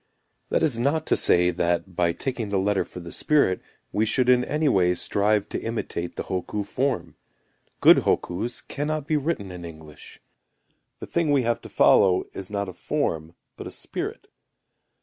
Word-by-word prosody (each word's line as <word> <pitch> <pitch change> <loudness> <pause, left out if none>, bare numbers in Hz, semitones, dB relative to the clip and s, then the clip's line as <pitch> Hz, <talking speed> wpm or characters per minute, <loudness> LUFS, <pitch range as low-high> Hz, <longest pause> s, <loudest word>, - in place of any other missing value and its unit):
That - - +1
is 130 -7 0
not 150 +5 +1
to - - +2
say, 90 0 +3
that, 85 +1 -1
by 85 -1 +2
taking 115 +3 -4
the 100 - 0
letter 100 +1 +1
for - - -10
the 85 -1 -9
spirit, 140 -12 +2 0.3
we 105 - +1
should 125 +3 +1
in 125 -1 +5
any 150 +4 0
way 90 -7 +3
strive 105 +3 +1
to - - -3
imitate 110 -6 -4
the - - -3
hokku 100 +2 -3
form. 130 - -2 0.6
Good - - +8
hokkus 95 +8 -1
cannot 150 0 -2
be 155 - 0
written 145 - -2
in 90 -1 -8
English. 80 -2 -12 0.8
The - - -7
thing 170 -2 0
we 140 -3 +3
have 120 0 0
to - - -10
follow 95 -2 +5
is 95 -1 -6
not 100 -1 -2
a 95 - -7
form, 80 0 -2 0.2
but - - -8
a - - -5
spirit. - - -5
100 Hz, 175 wpm, -25 LUFS, 90-130 Hz, 0.8 s, Good